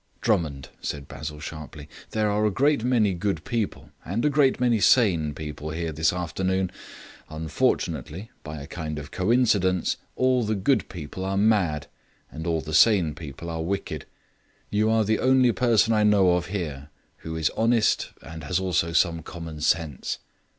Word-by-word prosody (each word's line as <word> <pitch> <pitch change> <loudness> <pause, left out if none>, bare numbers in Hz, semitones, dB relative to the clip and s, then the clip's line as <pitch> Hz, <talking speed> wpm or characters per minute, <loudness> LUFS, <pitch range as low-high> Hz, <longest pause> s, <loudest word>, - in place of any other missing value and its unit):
"Drummond," 75 - 0
said 70 -2 -4
Basil 75 +1 -7
sharply, 75 -1 -8 0.2
"there 110 -1 0
are 105 +1 +1
a 105 - +4
great 140 +4 +2
many 115 -6 +2
good 95 +3 -2
people, 120 -4 -3
and 105 - -2
a 150 - +3
great 140 -2 +3
many 120 -3 +3
sane 90 - +4
people 75 0 -6
here 80 +1 -3
this 80 +1 +2
afternoon. 95 +2 -1 0.6
Unfortunately, 80 +4 -2
by 75 -1 -7
a 70 - -8
kind 75 -1 -5
of 75 0 -7
coincidence, 95 -4 +2 0.2
all 130 -1 +2
the 110 0 0
good 105 +2 +1
people 85 +1 -7
are 95 +1 -1
mad, 95 -9 +2 0.5
and 80 +2 -6
all 80 -2 0
the 75 0 -7
sane 90 -3 +5
people 75 +1 -9
are 80 -1 -3
wicked. 100 +4 -3 0.6
You 105 +1 +2
are 110 0 +3
the 110 +1 +1
only 130 -1 +4
person 115 -1 +3
I 105 -1 +3
know 100 -3 +5
of 90 -1 0
here 75 -7 -4 0.3
who 80 0 -7
is 80 -2 +1
honest 115 -1 +2
and 80 0 -9
has 85 +5 0
also 85 -3 0
some 85 0 +2
common 80 -2 -8
sense. 80 -4 0
90 Hz, 165 wpm, -25 LUFS, 80-110 Hz, 0.6 s, sane